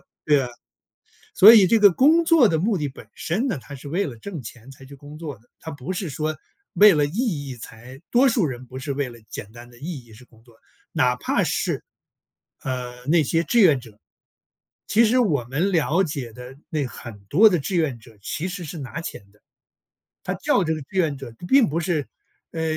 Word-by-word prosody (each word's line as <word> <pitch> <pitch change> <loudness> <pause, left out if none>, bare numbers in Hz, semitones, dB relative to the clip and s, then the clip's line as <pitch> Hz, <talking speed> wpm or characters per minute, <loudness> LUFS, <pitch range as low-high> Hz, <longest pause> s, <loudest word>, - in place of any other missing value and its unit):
啊。 - - -31 1.3
所 215 +4 +9
以 205 -4 +7
这 225 +5 +4
个 205 -1 +7
工 315 - +4
作 320 -7 +6
的 160 - +1
目 200 +5 +1
的 145 -2 -2
本 135 - -13
身 215 +11 -2
呢， 240 - -2
它 140 - -11
是 140 +2 -10
为 180 +7 0
了 125 - -8
挣 160 - -8
钱 120 +3 -11
才 135 0 -14
去 140 - -12
工 145 +2 -12
作 150 -8 -7
的。 120 - -30
它 160 - -7
不 145 +2 -8
是 180 -4 -4
说 155 +3 -3 0.4
为 210 -1 +8
了 145 -1 +2
意 - - -7 0.4
义 130 - -7
才 120 +3 -12
多 260 +3 +4
数 230 -5 +1
人 130 -2 -7
不 130 +1 -9
是 140 +1 -4
为 140 -1 -2
了 120 -1 -12
简 100 - -7
单 120 +1 -13
的 120 - -17
意 150 -4 -7
义 115 - -19
是 125 +4 -15
工 115 -2 -23
作。 120 -2 -21 0.4
哪 125 0 +2
怕 - - 0
是， - - -2 0.8
呃， 125 -1 -5
那 160 +2 +4
些 165 +4 0
志 235 +5 +2
愿 155 -9 +5
者。 110 -4 -16 0.9
其 230 +2 +4
实 245 +4 +3
我 150 - +1
们 150 +10 -1
了 165 +1 +2
解 140 -8 -5
的 125 +3 -11
那 150 -3 -1
很 120 -3 -10
多 215 +9 +6
的 180 - +1
志 185 +7 -4
愿 150 -7 0
者 110 -1 -18
其 155 - -4
实 180 -2 -6
是 160 +2 -7
拿 135 +3 -6
钱 100 -11 -9
的。 105 - -29 0.8
他 - - -2
叫 200 - +1
这 160 - 0
个 155 - -6
志 140 - -12
愿 155 -6 +1
者 130 -4 -9
他 - - -11
并 270 -3 +5
不 160 +3 -1
是 160 -4 -1 0.5
呃， 165 - -4
145 Hz, 235 characters per minute, -23 LUFS, 125-180 Hz, 1.3 s, 所